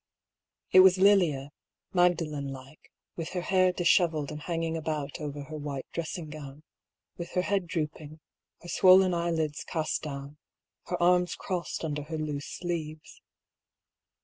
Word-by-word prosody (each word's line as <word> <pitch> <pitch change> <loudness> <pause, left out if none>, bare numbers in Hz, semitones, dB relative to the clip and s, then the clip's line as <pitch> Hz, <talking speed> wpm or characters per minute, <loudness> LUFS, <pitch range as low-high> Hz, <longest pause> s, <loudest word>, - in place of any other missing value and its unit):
It 185 - +8
was 185 0 +7
Lilia, 175 -8 +3 0.4
Magdalen 165 -6 +1
like, 135 +3 -12 0.2
with 165 0 -5
her 180 - -1
hair 185 0 +3
dishevelled 170 -4 +2
and 150 0 -7
hanging 165 0 -2
about 150 -3 -3
over 145 -1 -5
her 155 +2 -8
white 145 -3 -5
dressing 170 0 -4
gown, 145 -1 -9 0.5
with 170 0 -6
her 180 - +1
head 195 -3 0
drooping, 155 -2 -4 0.4
her - - -10
swollen 185 +1 +6
eyelids 165 -3 -1
cast 155 -2 -2
down, 140 0 -7 0.5
her 180 - -2
arms 180 0 +3
crossed 180 -3 -4
under 150 -1 -3
her 160 +2 -5
loose 150 -2 -4
sleeves. 160 -3 -5
160 Hz, 140 wpm, -28 LUFS, 150-175 Hz, 0.5 s, It